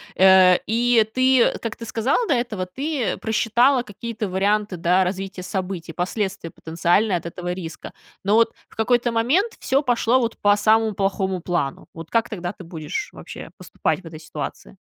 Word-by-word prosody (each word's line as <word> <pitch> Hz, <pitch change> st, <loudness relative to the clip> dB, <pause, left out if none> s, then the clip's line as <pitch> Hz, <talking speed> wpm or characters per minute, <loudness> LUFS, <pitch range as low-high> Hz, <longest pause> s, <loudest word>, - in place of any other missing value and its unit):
э, 190 Hz, -1 st, +7 dB
и 235 Hz, 0 st, +3 dB
ты, 255 Hz, -1 st, +5 dB
э, -, -, +1 dB
как 230 Hz, -1 st, -5 dB
ты 230 Hz, -, -8 dB
сказала 255 Hz, -, 0 dB
до 300 Hz, -, +3 dB
этого, 235 Hz, -7 st, -2 dB
ты 270 Hz, +6 st, -2 dB
просчитала 235 Hz, +4 st, +2 dB
какие-то 220 Hz, 0 st, -5 dB
варианты, 200 Hz, +2 st, 0 dB
да, 180 Hz, +3 st, +3 dB
развития 190 Hz, 0 st, -4 dB
событий, 180 Hz, -3 st, -4 dB
последствия 190 Hz, 0 st, -3 dB
потенциальные 175 Hz, +5 st, +1 dB
от 170 Hz, -, -9 dB
этого 175 Hz, +1 st, -4 dB
риска. 165 Hz, -3 st, -8 dB, 0.3 s
Но 205 Hz, +2 st, +3 dB
вот 230 Hz, 0 st, +4 dB
в -, -, -21 dB
какой-то 240 Hz, +1 st, +1 dB
момент 305 Hz, -, +2 dB
всё 270 Hz, +2 st, +1 dB
пошло 245 Hz, -2 st, +2 dB
вот 230 Hz, -2 st, -2 dB
по 205 Hz, 0 st, +5 dB
самому 220 Hz, +1 st, +3 dB
плохому 190 Hz, -1 st, -1 dB
плану. 170 Hz, -6 st, -3 dB
Вот 165 Hz, -1 st, -9 dB
как 230 Hz, -1 st, +2 dB
тогда 175 Hz, -4 st, -4 dB
ты 195 Hz, -, -12 dB
будешь 165 Hz, -, -5 dB
вообще -, -, -10 dB
поступать -, -, -2 dB
в -, -, -17 dB
этой 160 Hz, -1 st, -9 dB
ситуации? 110 Hz, -, -7 dB
205 Hz, 175 wpm, -22 LUFS, 180-235 Hz, 0.3 s, э